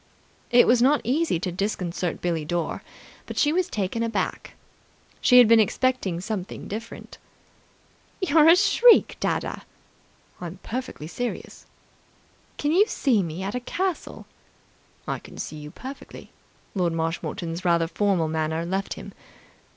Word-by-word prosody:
It 245 0 +6
was 240 0 +4
not 285 +4 +4
easy 280 - +1
to 185 - -2
disconcert 180 -2 -3
Billie 170 -3 -1
Dore, 170 +1 -2 0.5
but - - -7
she 295 +1 +3
was 370 +1 0
taken 205 - -2
aback. 230 0 -3 0.7
She 250 - +6
had 245 -2 +9
been 230 0 +6
expecting 220 -5 +1
something 190 -1 -5
different. 225 +3 -8 1.0
"You're 320 -5 +4
a 335 - +9
shriek, 450 +5 +5
dadda!" - - -2 0.8
"I'm 175 +1 -6
perfectly 250 -9 -5
serious." 245 +9 -6 0.9
"Can 295 - 0
you 395 +6 +4
see 250 - +1
me 170 +1 -5
at 195 - -3
a 250 - -1
castle?" 365 +7 -3 0.8
"I - - -2
can - - -14
see 155 - -6
you 150 0 -8
perfectly." 265 - -10 0.4
Lord 180 -4 0
Marshmoreton's 165 +1 -3
rather 170 -2 +3
formal 185 -1 0
manner 160 +1 -1
left 190 +3 -2
him. - - -10
205 Hz, 135 wpm, -25 LUFS, 170-255 Hz, 1.0 s, had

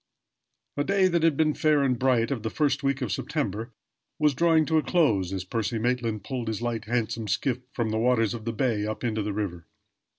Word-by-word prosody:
A 145 - +2
day 195 +2 +3
that 170 -1 +1
had 160 -3 +3
been 155 -1 +3
fair 150 -2 +2
and 125 -3 +1
bright, 125 -3 +2
of 130 -5 -2
the 110 - -2
first 145 +3 0
week 135 -1 0
of - - -3
September, 120 - -3 0.5
was 150 -2 +3
drawing 160 +2 +3
to 160 0 +2
a - - +1
close 110 - +2
as 95 -1 -3
Percy 115 +4 -2
Maitland 115 -3 -1
pulled 125 -1 -4
his 110 -2 -2
light, 115 -2 -3
handsome 115 -1 -2
skiff 115 +5 0
from 115 -3 -2
the 110 - 0
waters 115 -3 +2
of 115 -2 -7
the 115 - -1
bay 115 -2 0
up 110 - -5
into 110 -2 -1
the 105 0 -2
river. 95 -5 -4
120 Hz, 220 wpm, -26 LUFS, 110-145 Hz, 0.5 s, day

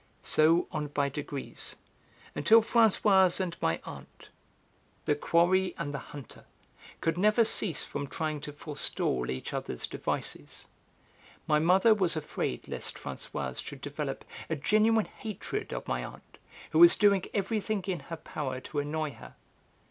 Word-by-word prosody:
So 160 +3 +4
on 150 -1 -2
by 145 -1 0
degrees, 140 -1 -5 0.6
until 225 +8 +6
Françoise 205 -5 +4
and 180 -3 -2
my 80 0 +1
aunt, - - -11 0.8
the - - +3
quarry 175 +5 +2
and 145 -4 -3
the 140 - -3
hunter, 145 -1 -11 0.6
could 165 +1 0
never 215 +3 +4
cease 200 -5 -1
from 145 0 -4
trying 155 0 -3
to 150 - -6
forestall 145 - -2
each 65 0 -4
other's - - -3
devices. - - -4 0.8
My 150 0 +3
mother 185 +7 +5
was 185 -6 +1
afraid 150 - -3
lest - - -4
Françoise 65 -1 -5
should - - -9
develop - - -4 0.2
a 160 - 0
genuine 215 +8 +3
hatred 215 -3 -5
of - - -5
my 60 - -1
aunt, - - -11 0.3
who 155 - +3
was 170 0 +9
doing 200 -3 +4
everything 205 0 -1
in 185 -3 -2
her 165 - -7
power 135 -5 -4
to 145 +3 -4
annoy 150 +1 -2
her. - - -13
165 Hz, 145 wpm, -30 LUFS, 145-195 Hz, 0.8 s, was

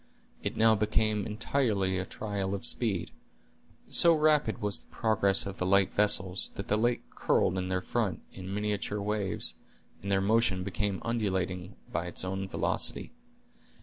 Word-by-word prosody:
It - - -4
now 110 0 +5
became 105 0 +1
entirely 105 -4 0
a 95 - -3
trial 100 -2 -3
of 100 - -6
speed. 105 -8 0 0.8
So 170 -2 +7
rapid 150 -6 +2
was 105 -1 +1
the - - -22
progress 100 -4 +1
of 100 -1 -7
the 90 - 0
light 100 0 +3
vessels, 95 -3 +3
that 100 - -6
the 105 - +3
lake 120 +2 +1
curled 90 - +1
in 95 0 -2
their 95 -1 0
front, 110 -1 -2
in 95 0 -8
miniature 105 +1 -2
waves, 100 - -1 0.5
and 100 - -4
their 95 - +3
motion 100 -2 +2
became 100 0 -2
undulating 95 -5 -2 0.2
by 85 - -2
its 90 - -3
own 95 +1 -3
velocity. - - -1
100 Hz, 155 wpm, -29 LUFS, 95-110 Hz, 0.8 s, So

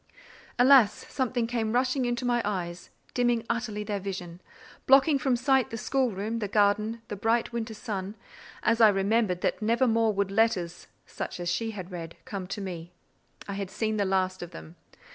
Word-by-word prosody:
Alas! 250 -4 +5
something 250 -3 -1
came 230 -2 -1
rushing 255 +1 +1
into 240 0 -1
my 240 -1 +2
eyes, 180 -4 -4 0.2
dimming 240 -2 +1
utterly 225 -3 -3
their 205 -1 -3
vision, 180 -3 -6 0.5
blotting 275 +2 +6
from 260 -1 +1
sight 260 0 +2
the 230 - -5
schoolroom, 230 -3 -1
the 210 - -2
garden, 210 +3 +1
the - - -5
bright 225 +4 +1
winter 225 -1 -3
sun, 205 -2 -5 0.5
as 230 - +2
I 220 - +9
remembered 195 -1 +1
that - - -1
never 230 +4 +2
more 225 -2 +3
would 200 -1 -1
letters, 195 -5 0 0.2
such - - -6
as 175 0 -2
she 225 -1 -1
had 190 -4 -7
read, 165 -2 -7
come 195 -3 -5
to 205 +2 -5
me. 175 -3 -6 0.6
I 200 - -4
had 195 -1 -4
seen 215 +2 -2
the 205 - +2
last 185 -1 0
of 175 - -6
them. 80 +1 -11
215 Hz, 180 wpm, -28 LUFS, 190-235 Hz, 0.6 s, I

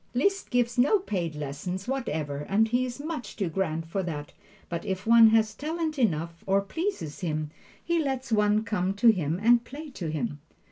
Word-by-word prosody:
Liszt 390 +10 +1
gives 245 -1 +1
no 290 - +5
paid 180 - -3
lessons 150 +7 -5
whatever, 155 - -2
as 220 +3 +3
he 245 +2 +2
is 250 +1 -6
much 305 -3 -5
too 195 -5 -1
grand 165 -2 -1
for 180 +4 -2
that, 150 -5 -5 0.3
but 170 -1 -4
if 190 -1 -3
one 230 0 +8
has 220 -1 +3
talent 310 +3 -3
enough, 170 -6 0
or 195 +1 +4
pleases 320 - -4
him, 155 -4 -2 0.3
he 340 -1 +1
lets 265 -2 -3
one 210 0 +3
come 190 -3 -1
to 230 +4 +5
him 170 -5 +1
and 235 +2 +5
play 295 +4 -9
to 175 -10 -5
him. 145 -2 -3
210 Hz, 185 wpm, -27 LUFS, 165-255 Hz, 0.3 s, one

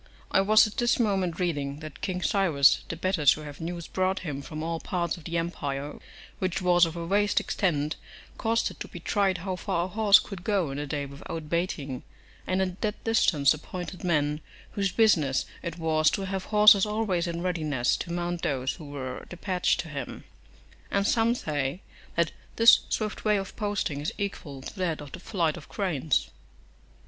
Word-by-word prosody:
I 195 - +4
was 215 +3 +6
at 215 - -7
this 240 0 +2
moment 190 -7 +1
reading, 145 -6 -1
that 155 -1 -9
King 185 -2 -2
Cyrus, 165 -9 +4
the - - -3
better 185 -1 -1
to 145 +2 +5
have 145 0 -9
news 170 0 -4
brought 185 +1 0
him 145 -5 -4
from 155 +2 -6
all 165 0 -2
parts 170 -2 -2
of 170 - -14
the 170 0 -2
empire, 145 -4 -3 0.4
which 185 0 -1
was 175 -2 +4
of 165 - -7
a 170 -1 -4
vast 205 +3 +2
extent, 155 -5 -1 0.4
caused 225 +1 0
it - - -14
to - - -5
be 175 - -9
tried 190 +1 +1
how 185 +1 -3
far 180 -2 -1
a - - -4
horse 205 0 +6
could 195 -4 -6
go 190 -8 +1
in 140 - -4
a 145 - -4
day 145 0 -2
without 150 +3 -7
baiting, 150 -7 -2 0.5
and 185 +1 +1
at 185 0 -5
that 210 -1 -2
distance 165 - +4
appointed 180 +4 -7
men, 150 -3 +1 0.3
whose 200 -3 0
business 160 - +3 0.2
it 170 0 -5
was 155 -1 +3
to 195 - -2
have 190 -1 -3
horses 210 -2 +7
always 210 -5 0
in 170 0 -3
readiness, 155 -9 0
to 170 - -5
mount 175 0 -2
those 130 -2 -1
who 160 - -11
were 135 -3 -6
despatched 180 0 0
to 170 - -11
him; 145 -3 -6 0.7
and 200 0 +1
some 230 +2 +3
say, 145 - -2 0.4
that 170 -1 +2 0.2
this 230 0 +8
swift 215 -1 -2
way 210 -1 +3
of 195 -1 -5
posting 205 -9 -2
is 150 - -2
equal 150 -9 -5
to - - -8
that 170 -4 0
of 145 -2 -9
the - - -8
flight 170 -5 0
of 155 - -12
cranes. 160 -8 0
175 Hz, 190 wpm, -27 LUFS, 150-195 Hz, 0.7 s, this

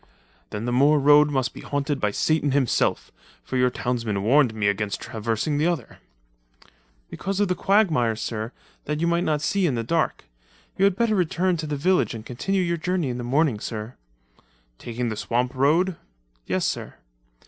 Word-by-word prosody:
"Then 105 +2 -5
the 120 - -1
moor 140 +5 +4
road 145 +1 +6
must 130 -3 -1
be - - -10
haunted 145 0 -2
by 105 - +1
Satan 145 +6 +1
himself, 135 -4 +1 0.3
for - - -6
your 125 0 +3
townsmen 115 -6 -2
warned 130 +2 +4
me 110 -2 -1
against 100 0 -1
traversing 115 +5 -2
the 155 - +2
other." 165 -10 -3 1.1
"Because 195 +1 -3
of 205 -2 +2
the - - +3
quagmires, 165 - +2
sir, 110 0 -4 0.3
that 150 +1 -2
you 170 - +1
might 170 +1 +1
not 150 -3 0
see 195 -3 +1
in 135 - 0
the 115 - -2
dark. 160 - -1 0.5
You 195 - +3
had 200 -2 +3
better 230 +1 +1
return 180 -1 +1
to 155 -1 -4
the 150 -1 -2
village 180 -3 +1
and 110 -1 -8
continue 185 +11 -1
your 170 -1 0
journey 175 -3 -1
in 125 0 -4
the - - -4
morning, 135 -2 +1
sir." 110 +2 -5 0.9
"Taking 120 0 -3
the 110 - -3
swamp 120 +4 -1
road?" 160 +7 +2 0.5
"Yes, - - 0
sir." - - -3
140 Hz, 180 wpm, -24 LUFS, 120-170 Hz, 1.1 s, road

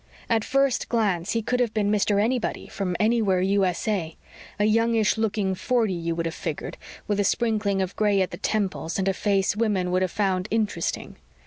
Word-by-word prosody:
At 225 -2 +3
first 275 0 +1
glance 200 -7 0
he 230 -1 0
could 250 +3 0
have 235 -3 0
been 205 -1 +1
Mr. 205 -1 +2
Anybody, 235 +3 -1
from 185 -3 -3
Anywhere, 215 -4 +2
U.S.A. 190 -2 0 0.4
A 205 - +2
youngish 225 0 +2
looking 210 -3 0
forty, 225 +1 0
you 170 -1 -2
would 170 0 -2
have 165 - -2
figured, 160 -4 -5 0.3
with 205 -1 0
a - - +3
sprinkling 210 -2 +1
of 185 - -5
gray 205 -2 +2
at 185 - 0
the - - -6
temples 190 -5 -2
and 195 -1 0
a 195 - +2
face 195 0 +1
women 205 -5 0
could 185 +1 +2
have 185 - +1
found 190 -1 0
interesting. 210 -6 -2
205 Hz, 190 wpm, -25 LUFS, 185-220 Hz, 0.4 s, At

